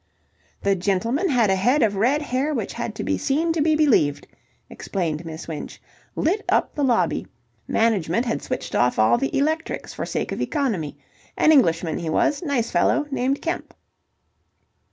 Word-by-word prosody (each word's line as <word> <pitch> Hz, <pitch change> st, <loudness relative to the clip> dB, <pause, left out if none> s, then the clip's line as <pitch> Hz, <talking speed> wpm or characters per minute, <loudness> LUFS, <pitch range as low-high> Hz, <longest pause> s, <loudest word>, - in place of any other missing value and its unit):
"The 200 Hz, 0 st, +3 dB
gentleman 230 Hz, -, 0 dB
had 235 Hz, -7 st, +3 dB
a -, -, +3 dB
head 245 Hz, +9 st, +2 dB
of 205 Hz, -2 st, +1 dB
red 260 Hz, +9 st, +2 dB
hair 285 Hz, +3 st, -1 dB
which -, -, -3 dB
had -, -, -4 dB
to -, -, -4 dB
be -, -, -1 dB
seen 320 Hz, +4 st, +1 dB
to 325 Hz, -, 0 dB
be 310 Hz, +1 st, +3 dB
believed," 215 Hz, -, +2 dB, 0.4 s
explained 170 Hz, -4 st, -3 dB
Miss 160 Hz, 0 st, -7 dB
Winch. 160 Hz, -3 st, -7 dB, 0.4 s
"Lit 385 Hz, +7 st, 0 dB
up -, -, +2 dB
the 290 Hz, -, -2 dB
lobby. 245 Hz, -4 st, +1 dB, 0.4 s
Management 220 Hz, -1 st, +1 dB
had 230 Hz, -, -2 dB
switched 255 Hz, -, -5 dB
off 125 Hz, 0 st, +2 dB
all 110 Hz, +2 st, +4 dB
the 135 Hz, -, -1 dB
electrics 315 Hz, +3 st, -1 dB
for -, -, -5 dB
sake -, -, -3 dB
of -, -, -3 dB
economy. 220 Hz, -, -2 dB, 0.4 s
An 310 Hz, -, +5 dB
Englishman 165 Hz, -, +3 dB
he 165 Hz, -2 st, -4 dB
was. 285 Hz, -, +1 dB
Nice 280 Hz, -8 st, -1 dB
fellow. 300 Hz, -, +2 dB
Named 270 Hz, +1 st, 0 dB
Kemp." 335 Hz, +1 st, -4 dB
240 Hz, 170 wpm, -23 LUFS, 175-295 Hz, 0.4 s, An